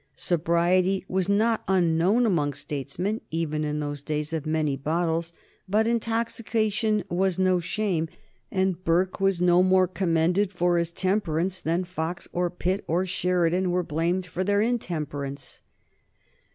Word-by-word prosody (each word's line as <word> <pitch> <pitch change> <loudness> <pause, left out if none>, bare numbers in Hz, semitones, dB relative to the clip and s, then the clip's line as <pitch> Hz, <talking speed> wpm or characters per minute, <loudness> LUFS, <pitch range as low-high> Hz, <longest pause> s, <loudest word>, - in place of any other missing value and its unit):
Sobriety 180 +3 +1
was 190 0 -1
not 220 +3 +2
unknown 185 +5 +3
among 150 -9 +1
statesmen 145 - -3
even 155 -2 -2
in 150 0 -2
those 145 -1 -4
days 150 +1 -3
of 155 -2 -3
many 155 -3 0
bottles, 165 +3 -1 0.4
but 215 +3 +3
intoxication 225 -2 0
was 185 +1 0
no 185 -1 +3
shame, 175 -2 -1 0.4
and 190 -2 0
Burke 180 +3 +1
was 195 -2 +2
no 180 0 +5
more 185 0 +4
commended 180 +2 +1
for 175 -2 +1
his 170 0 -1
temperance 185 -1 0
than 170 +3 0
Fox, 175 -1 -4
or 175 0 0
Pitt, 185 +3 -2
or 175 +4 +1
Sheridan 180 0 +1
were 180 0 +1
blamed 170 +4 -1
for 180 +1 -3
their 200 +1 +2
intemperance. 150 - -3
180 Hz, 140 wpm, -26 LUFS, 165-190 Hz, 0.4 s, no